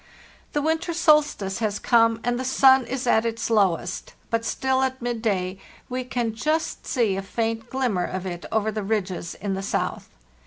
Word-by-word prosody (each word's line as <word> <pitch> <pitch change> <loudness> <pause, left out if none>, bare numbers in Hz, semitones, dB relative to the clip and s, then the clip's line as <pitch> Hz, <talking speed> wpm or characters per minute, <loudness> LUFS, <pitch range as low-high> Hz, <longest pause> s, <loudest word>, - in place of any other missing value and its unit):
"The 295 - 0
winter 325 +2 0
solstice 300 - +3
has 210 -2 0
come, 230 -1 +3
and 245 +1 0
the - - -2
sun 260 -1 +5
is 255 +1 -3
at 220 -2 +4
its 230 0 -2
lowest; 190 -5 +1 0.2
but 230 0 +1
still 265 +2 0
at 260 0 0
midday 215 -6 -1 0.3
we 255 0 -2
can 240 -3 -2
just 310 +8 -1
see 230 -7 +1
a - - -1
faint 225 +3 -3
glim 260 -4 0
mer 180 -1 0
of 185 0 -4
it 175 -2 -5
over 220 0 +1
the 215 0 -3
ridges 195 -4 -2
in 200 -1 -3
the 190 - -3
south. 195 - -2
230 Hz, 185 wpm, -24 LUFS, 200-260 Hz, 0.3 s, sun